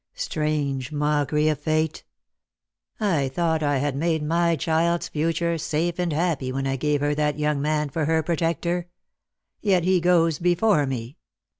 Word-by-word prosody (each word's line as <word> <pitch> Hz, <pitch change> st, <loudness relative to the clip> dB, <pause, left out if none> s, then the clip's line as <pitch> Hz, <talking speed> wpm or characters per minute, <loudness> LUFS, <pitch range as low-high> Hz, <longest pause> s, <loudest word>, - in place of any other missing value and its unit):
Strange 150 Hz, -, -2 dB
mockery 150 Hz, 0 st, +1 dB
of 155 Hz, -3 st, +1 dB
Fate! 155 Hz, +1 st, -1 dB, 0.9 s
I 165 Hz, -11 st, +1 dB
thought 160 Hz, +3 st, 0 dB
I 145 Hz, -2 st, +1 dB
had 140 Hz, 0 st, -1 dB
made 160 Hz, +1 st, 0 dB
my 170 Hz, +2 st, +2 dB
child's 165 Hz, +2 st, 0 dB
future 165 Hz, +2 st, -1 dB
safe 165 Hz, +3 st, -1 dB
and 175 Hz, -2 st, 0 dB
happy 155 Hz, -5 st, -1 dB
when 135 Hz, +1 st, -2 dB
I 135 Hz, 0 st, 0 dB
gave 145 Hz, +1 st, 0 dB
her 145 Hz, 0 st, +1 dB
that 150 Hz, -1 st, 0 dB
young 150 Hz, -1 st, 0 dB
man 150 Hz, 0 st, 0 dB
for 155 Hz, +1 st, -1 dB
her 160 Hz, +1 st, +1 dB
protector. 170 Hz, +2 st, -1 dB, 0.7 s
Yet 190 Hz, -5 st, +2 dB
he 185 Hz, 0 st, +2 dB
goes 165 Hz, -3 st, +3 dB
before 175 Hz, -3 st, +2 dB
me. 130 Hz, +3 st, -5 dB
155 Hz, 155 wpm, -24 LUFS, 145-170 Hz, 0.9 s, goes